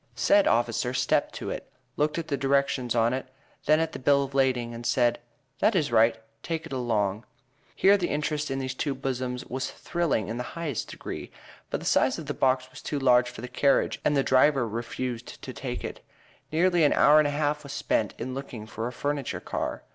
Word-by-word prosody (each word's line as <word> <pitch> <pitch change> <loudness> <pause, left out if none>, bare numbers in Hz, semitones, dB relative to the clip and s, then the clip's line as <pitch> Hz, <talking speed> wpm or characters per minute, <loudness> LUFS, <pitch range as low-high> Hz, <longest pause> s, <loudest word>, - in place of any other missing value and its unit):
Said 200 - +4
officer 120 +2 +1
stepped - - +1
to - - -4
it, - - -7 0.2
looked 150 +2 0
at 165 -1 -3
the 140 - 0
directions 135 -2 +1
on 115 +1 +3
it, 130 0 -3 0.4
then 155 +1 +5
at 165 0 0
the - - -7
bill 140 +2 +3
of 135 0 -7
lading, 130 -3 +1
and 115 +1 -7
said, 120 0 +2 0.4
"That 220 - +3
is 155 -8 +1
right, 115 0 +4 0.2
take 165 -1 -3
it 165 - -8
along." 110 -5 0 0.5
Here 200 +1 +5
the 180 -3 -2
interest 150 0 -1
in 135 - -2
these 130 -1 -3
two 140 +1 -2
bosoms 130 -1 -3
was 130 +1 -3
thrilling 170 - -1
in 115 +2 -4
the 125 - -2
highest 155 -8 -3
degree. - - -7 0.4
But - - -3
the - - -8
size - - +3
of - - -7
the - - -3
box 130 -1 +1
was - - -11
too 150 - -3
large 125 -2 +4
for 120 - -10
the 125 - -5
carriage, 140 +2 +1
and 145 - +2
the 135 - +3
driver 130 -1 +4
refused 120 +2 -5
to - - -6
take - - -5
it. - - -6 0.5
Nearly 175 +1 +3
an 145 - +5
hour 150 +2 +6
and 150 - +4
a 145 0 -2
half 150 0 0
was 140 -2 -9
spent 110 -6 -1
in 130 - -4
looking 130 -5 -6
for 115 +1 -4
a - - -4
furniture 145 +1 -3
car. - - -4
135 Hz, 215 wpm, -27 LUFS, 120-150 Hz, 0.5 s, hour